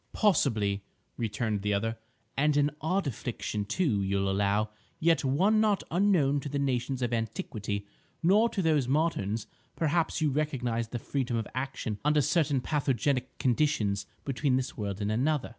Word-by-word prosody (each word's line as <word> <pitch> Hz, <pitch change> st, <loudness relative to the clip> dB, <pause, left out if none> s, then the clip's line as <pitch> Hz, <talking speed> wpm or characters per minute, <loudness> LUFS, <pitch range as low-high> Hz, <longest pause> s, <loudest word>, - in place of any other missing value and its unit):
"Possibly," 110 Hz, -, +2 dB, 0.3 s
returned 110 Hz, -2 st, -1 dB
the 105 Hz, 0 st, +1 dB
other, 115 Hz, +3 st, -1 dB, 0.4 s
"and 145 Hz, +1 st, +2 dB
an 145 Hz, 0 st, +3 dB
odd 185 Hz, +4 st, 0 dB
affliction, 110 Hz, -4 st, -3 dB
too, 120 Hz, -, +1 dB
you'll 100 Hz, 0 st, 0 dB
allow, 100 Hz, +2 st, +1 dB, 0.3 s
yet 165 Hz, -2 st, +3 dB
one 190 Hz, +11 st, +3 dB
not 210 Hz, -2 st, +2 dB
unknown 170 Hz, -6 st, +3 dB
to 145 Hz, -, -5 dB
the 140 Hz, -, -2 dB
nations 130 Hz, -1 st, -1 dB
of 120 Hz, 0 st, -1 dB
antiquity, 105 Hz, -2 st, -3 dB, 0.4 s
nor 210 Hz, +7 st, +5 dB
to 195 Hz, -, -2 dB
those 150 Hz, -6 st, +2 dB
moderns, 125 Hz, -8 st, 0 dB, 0.3 s
perhaps, 160 Hz, +1 st, +1 dB
who 155 Hz, -3 st, +1 dB
recognise 125 Hz, -6 st, -1 dB
the 120 Hz, -, -4 dB
freedom 125 Hz, 0 st, -2 dB
of 115 Hz, -, -2 dB
action 125 Hz, -4 st, -3 dB
under 150 Hz, +1 st, +3 dB
certain 145 Hz, -3 st, +2 dB
pathogenic 135 Hz, -2 st, 0 dB
conditions 115 Hz, -7 st, +1 dB, 0.2 s
between 135 Hz, 0 st, +1 dB
this 130 Hz, 0 st, -3 dB
world 100 Hz, -2 st, -4 dB
and 105 Hz, +1 st, 0 dB
another." 135 Hz, +5 st, +1 dB
130 Hz, 155 wpm, -29 LUFS, 110-150 Hz, 0.4 s, nor